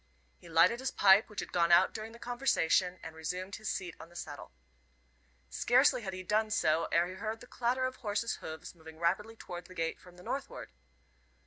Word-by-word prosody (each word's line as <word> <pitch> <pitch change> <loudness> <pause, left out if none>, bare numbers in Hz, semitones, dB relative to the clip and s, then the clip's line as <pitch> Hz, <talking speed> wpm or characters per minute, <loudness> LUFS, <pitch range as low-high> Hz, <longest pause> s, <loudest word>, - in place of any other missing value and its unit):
He 170 - -14
lighted 165 +9 +5
his 265 0 -1
pipe, 195 +2 +5
which 210 - -4
had - - -8
gone 170 -1 +2
out 175 +2 +6
during 220 0 -6
the 230 - -12
conversation, 235 -8 +1
and 160 0 -8
resumed 180 +5 -4
his 215 0 -4
seat 180 -3 -4
on 165 - -11
the 175 - -19
settle. 145 -4 -8 1.0
Scarcely 255 +1 +4
had 195 -4 -4
he 185 0 -6
done 215 +3 +1
so 165 -5 +2
ere 170 +1 +4
he 185 - -7
heard 215 +3 -4
the - - -12
clatter 250 +2 0
of 255 0 -3
horse's 215 0 -2
hoofs 160 0 -8
moving 160 -2 -13
rapidly 190 +7 0
towards 175 -5 -8
the 185 - -13
gate 165 -1 -2
from 180 -1 -16
the 180 - -13
northward. 275 +6 -5
190 Hz, 205 wpm, -32 LUFS, 170-225 Hz, 1.0 s, out